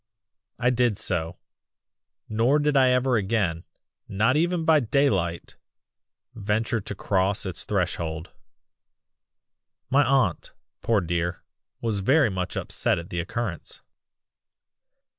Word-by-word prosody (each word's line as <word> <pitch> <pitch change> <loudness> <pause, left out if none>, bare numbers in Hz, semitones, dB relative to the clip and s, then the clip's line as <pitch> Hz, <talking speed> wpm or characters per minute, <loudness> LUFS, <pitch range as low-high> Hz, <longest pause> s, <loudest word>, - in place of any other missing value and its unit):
"I 125 0 +2
did 120 -4 +1
so 85 -5 -2 0.9
nor 115 +6 +2
did 150 -1 +1
I 130 -2 +5
ever 125 -1 +2
again 95 -5 -1 0.4
not 115 +7 +1
even 170 +1 +1
by 160 -1 +5
daylight 105 -10 0 0.8
venture 110 +2 -1
to 100 - -6
cross 95 +1 0
its 95 -2 -3
threshold. 85 -4 -2 1.6
"My 140 +2 +5
aunt, 130 -9 +1 0.3
poor 110 -3 +2
dear, 85 +1 -2 0.4
was 110 -3 -1
very 130 +4 +3
much 90 -1 -4
upset - - 0
at 85 +1 -8
the 85 - -2
occurrence. 95 +1 -5
105 Hz, 110 wpm, -25 LUFS, 90-125 Hz, 1.6 s, I